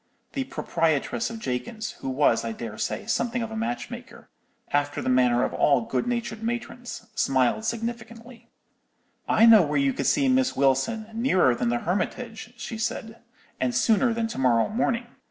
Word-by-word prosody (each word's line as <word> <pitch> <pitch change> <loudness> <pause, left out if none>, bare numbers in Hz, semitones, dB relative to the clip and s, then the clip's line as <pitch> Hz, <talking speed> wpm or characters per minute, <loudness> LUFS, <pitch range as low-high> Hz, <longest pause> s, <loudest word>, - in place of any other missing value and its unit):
"The 270 -1 -2
proprietress 165 - -1
of 230 - -6
Jakins's, 215 - -4
who 135 - -4
was, 130 -3 +2
I 115 -1 -3
dare 110 -1 -7
say, - - -2
something 240 0 -1
of 225 - -5
a - - -5
matchmaker, 240 +2 -5 0.4
after 145 0 +1
the - - -2
manner 125 -1 +3
of - - -1
all 140 -4 +3
good 120 +2 -2
natured 235 -2 -2
matrons, 240 0 -5
smiled 135 - +1
significantly. 230 +1 -5 0.8
"'I 225 - +5
know 225 -3 +9
where 150 -3 0
you 140 -1 +2
could - - -2
see 280 -2 +3
Miss 260 0 +2
Wilson, 140 - +1
nearer 220 - +3
than 120 - -1
the 120 - +1
Hermitage,' 225 +6 -3
she 230 -1 -6
said, 225 0 -4 0.4
'and 125 -2 0
sooner 225 - +3
than 230 0 -1
to - - -5
morrow 120 -3 +3
morning. 235 +1 0
220 Hz, 170 wpm, -25 LUFS, -, 0.8 s, know